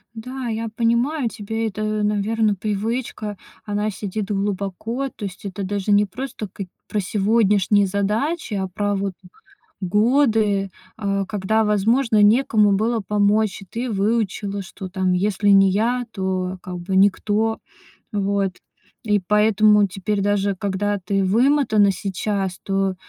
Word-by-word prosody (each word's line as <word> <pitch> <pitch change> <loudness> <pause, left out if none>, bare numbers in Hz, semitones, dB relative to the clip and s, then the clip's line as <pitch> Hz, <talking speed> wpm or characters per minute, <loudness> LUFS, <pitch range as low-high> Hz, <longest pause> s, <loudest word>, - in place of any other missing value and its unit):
Да, 250 +3 -6
я 225 0 -3
понимаю, 235 +4 +1
тебе 225 +2 -3
это, 215 0 -4 0.2
наверно, 210 +1 +1
привычка. 215 +1 -3 0.3
Она 210 +1 -1
сидит 205 +1 -4
глубоко. 200 +6 -2
То 210 - -8
есть 190 +1 -8
это 195 0 -5
даже 200 +1 -2
не 205 0 +5
просто 235 +1 -6
как 195 -1 -7 0.2
про 210 - -1
сегодняшние 205 0 +2
задачи, 210 - -1
а 190 -1 -1
про 205 +2 -1
вот 195 -1 -2 0.7
годы, 210 -1 +2 0.3
э, 200 -1 -1
когда, 215 +1 0
возможно, 215 +2 +2
некому 215 -1 +4
было 225 +3 +1
помочь. 205 0 +1
И - - -15
ты 235 +5 -4
выучила, 205 -1 -1
что 190 0 -8
там 185 -1 0
если 200 +2 +1
не 195 -1 +6
я, 240 +5 0
то 185 -2 -2
как 180 -1 -6
бы 185 +2 -3
никто. 205 +3 +2 0.5
Вот. 200 -2 0 0.5
И 210 -2 +2
поэтому 210 +1 +4
теперь 200 +2 -2
даже 200 0 +1
когда 205 +1 -1
ты 195 +1 +1
вымотана 225 -1 +3
сейчас, 195 -1 -2
то, 195 -1 0
205 Hz, 135 wpm, -21 LUFS, 195-220 Hz, 0.7 s, не